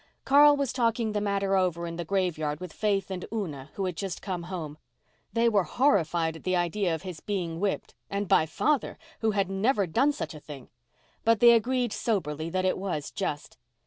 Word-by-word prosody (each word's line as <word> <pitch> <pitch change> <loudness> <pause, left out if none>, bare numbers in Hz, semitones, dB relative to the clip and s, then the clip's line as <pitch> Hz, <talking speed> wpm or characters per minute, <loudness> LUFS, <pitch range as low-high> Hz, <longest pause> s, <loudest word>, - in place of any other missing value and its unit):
Carl 290 +1 +7
was 280 -3 -1
talking 230 -2 +1
the 210 -1 -1
matter 200 -1 0
over 180 -3 +1
in 170 0 -5
the 175 - -3
graveyard 160 -5 -1
with 180 -3 -8
Faith 200 -3 0
and 185 -1 -4
Una, 155 -11 -4
who 195 - -2
had 180 -2 -2
just 190 0 -4
come 185 -3 -4
home. 155 -5 -5 0.5
They 230 +1 +2
were 210 -4 +4
horrified 170 - +1
at - - -16
the 185 0 +1
idea 175 0 0
of 160 - -9
his 180 -4 -7
being 175 -5 -3
whipped—and 200 0 -3
by 160 - +4
father, 285 - 0 0.2
who 220 - +1
had 200 -3 +1
never 200 +2 +2
done 270 - +2
such 285 - -5
a 155 - -9
thing! 145 -3 -11 0.5
But 230 -1 +4
they 235 +1 +8
agreed 240 0 +2
soberly 160 -8 -2
that 185 +2 -1
it 185 - +1
was 180 -7 -3
just. 150 -9 -4
190 Hz, 195 wpm, -28 LUFS, 165-220 Hz, 0.5 s, they